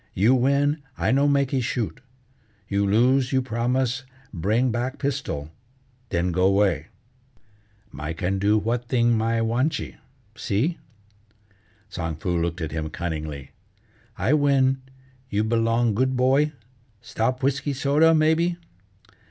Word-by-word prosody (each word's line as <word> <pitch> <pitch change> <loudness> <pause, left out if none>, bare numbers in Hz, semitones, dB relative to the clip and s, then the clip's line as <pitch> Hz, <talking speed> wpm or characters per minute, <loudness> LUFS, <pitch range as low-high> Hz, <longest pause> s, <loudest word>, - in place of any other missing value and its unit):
You 110 +7 +4
win, 140 +4 +2 0.2
I - - +1
no 140 +2 +3
makee 140 -2 +1
shoot; 120 +1 -3 0.7
you 100 0 0
lose, 125 +5 +3
you 130 - +3
promise 125 +2 -1 0.3
bring 110 +8 +1
back 125 +4 -2
pistol, 130 - -3 0.6
then 85 +1 0
go 90 +2 +3
way. 95 -6 +1 1.0
My 75 +2 -5
can 95 +3 -2
do 105 +2 +3
what 115 +3 -1
thing 120 -1 +2
my 115 +1 0
wantchee, 130 +7 -1 0.4
see?" 140 - -1 1.1
Tsang 80 -5 -4
Foo 90 +2 -2
looked 85 +1 -2
at 80 - -3
him 80 0 -3
cunningly: 75 -5 -5 0.7
"I 140 - +1
win, 135 -3 +3 0.5
you 105 -1 0
belong 115 0 +1
good 130 +4 0
boy? 135 +4 +3 0.5
Stop 125 +3 -2
whisky 140 +1 0
soda, 145 +4 +3
maybe?" 160 +3 +2
120 Hz, 125 wpm, -24 LUFS, 100-135 Hz, 1.1 s, You